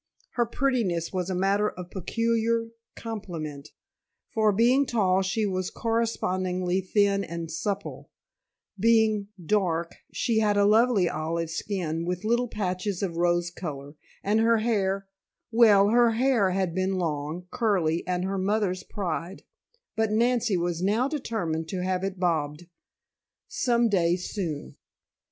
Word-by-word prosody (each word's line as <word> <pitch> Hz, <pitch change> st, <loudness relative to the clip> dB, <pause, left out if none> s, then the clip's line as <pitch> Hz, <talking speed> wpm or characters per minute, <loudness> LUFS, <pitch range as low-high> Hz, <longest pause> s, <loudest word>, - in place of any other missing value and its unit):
Her 240 Hz, -2 st, 0 dB
prettiness 230 Hz, -11 st, 0 dB
was 185 Hz, -1 st, -2 dB
a 185 Hz, -, -1 dB
matter 200 Hz, +3 st, +2 dB
of 180 Hz, -1 st, -9 dB
peculiar 230 Hz, +4 st, 0 dB, 0.3 s
complement, 165 Hz, -10 st, -6 dB, 0.6 s
for 215 Hz, -1 st, +3 dB
being 245 Hz, +7 st, +3 dB
tall 195 Hz, -5 st, +2 dB
she 195 Hz, +3 st, 0 dB
was 185 Hz, -2 st, -2 dB
correspondingly 185 Hz, -5 st, -1 dB
thin 200 Hz, +1 st, +2 dB
and 165 Hz, -1 st, -6 dB
supple, 200 Hz, +4 st, -4 dB, 0.7 s
being 220 Hz, -1 st, +3 dB, 0.2 s
dark 170 Hz, -4 st, 0 dB, 0.2 s
she 230 Hz, -3 st, 0 dB
had 210 Hz, -2 st, +2 dB
a 200 Hz, -, +4 dB
lovely 215 Hz, -2 st, +4 dB
olive 165 Hz, +1 st, -2 dB
skin 165 Hz, -3 st, -3 dB
with 180 Hz, +2 st, -3 dB
little 240 Hz, +3 st, +1 dB
patches 195 Hz, -2 st, -3 dB
of 170 Hz, -4 st, -3 dB
rose 175 Hz, 0 st, +1 dB
color, 145 Hz, -5 st, -7 dB, 0.3 s
and 210 Hz, +2 st, +2 dB
her 230 Hz, +1 st, +4 dB
hair 195 Hz, -3 st, 0 dB, 0.4 s
well, 210 Hz, -4 st, +6 dB
her 235 Hz, 0 st, +4 dB
hair 235 Hz, -4 st, +2 dB
had 185 Hz, -2 st, -1 dB
been 185 Hz, +1 st, 0 dB
long, 160 Hz, 0 st, -3 dB
curly, 180 Hz, -8 st, +1 dB
and 180 Hz, 0 st, -1 dB
her 195 Hz, 0 st, -2 dB
mother's 195 Hz, -1 st, 0 dB
pride, 180 Hz, -1 st, -4 dB, 0.5 s
but 220 Hz, -1 st, +1 dB
Nancy 235 Hz, -2 st, +2 dB
was 175 Hz, -1 st, -2 dB
now 215 Hz, +7 st, +2 dB
determined 215 Hz, -, -3 dB
to 180 Hz, 0 st, -3 dB
have 185 Hz, 0 st, -1 dB
it 195 Hz, -1 st, -3 dB
bobbed 160 Hz, -3 st, -1 dB, 0.8 s
some 235 Hz, -1 st, +1 dB
day 175 Hz, -5 st, +2 dB
soon! 175 Hz, -5 st, -5 dB
195 Hz, 135 wpm, -26 LUFS, 175-220 Hz, 0.8 s, well